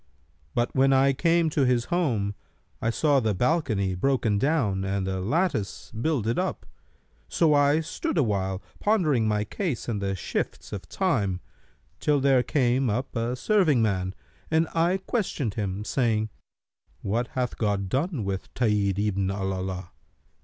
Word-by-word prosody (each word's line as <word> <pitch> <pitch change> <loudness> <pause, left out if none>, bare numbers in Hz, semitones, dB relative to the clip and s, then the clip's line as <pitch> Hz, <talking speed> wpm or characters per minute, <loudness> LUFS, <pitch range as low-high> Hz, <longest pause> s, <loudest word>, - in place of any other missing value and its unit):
But 120 0 0
when 135 +1 +4
I 135 +1 +4
came 165 +3 +2
to 145 - +2
his 125 -2 +2
home, 115 - +1 0.5
I 115 - +1
saw 145 +4 +3
the 110 -5 0
balcony 110 - +1
broken 110 0 +1
down 120 -10 +1
and 95 0 -1
the 95 0 -2
lattice 115 - -1
builded 115 - 0
up; 185 - -2 0.6
so 160 -3 +3
I 145 +2 +4
stood 160 - -3
awhile, 100 -7 0 0.2
pondering 155 - +2
my 105 -1 +1
case 145 - -3
and 110 -4 -2
the 95 0 -1
shifts 95 - -4
of 95 -3 -6
Time, 110 - 0 0.6
till 145 -1 +2
there 135 -2 +4
came 130 -1 +1
up 125 +6 -2
a 115 +1 -1
serving 160 - +3
man, 95 -3 -1 0.3
and 160 +1 +2
I 170 +3 +2
questioned 155 - -1
him, 100 -1 -3
saying, 110 -3 +1 0.7
'What 115 +5 0
hath 125 -1 -2
God 100 -3 0
done 140 - -1
with 95 -1 -4
Tahir 105 -5 +2
ibn 100 -2 0
al 95 0 -2
Alaa?' 95 -1 -4
120 Hz, 150 wpm, -26 LUFS, 100-145 Hz, 0.7 s, when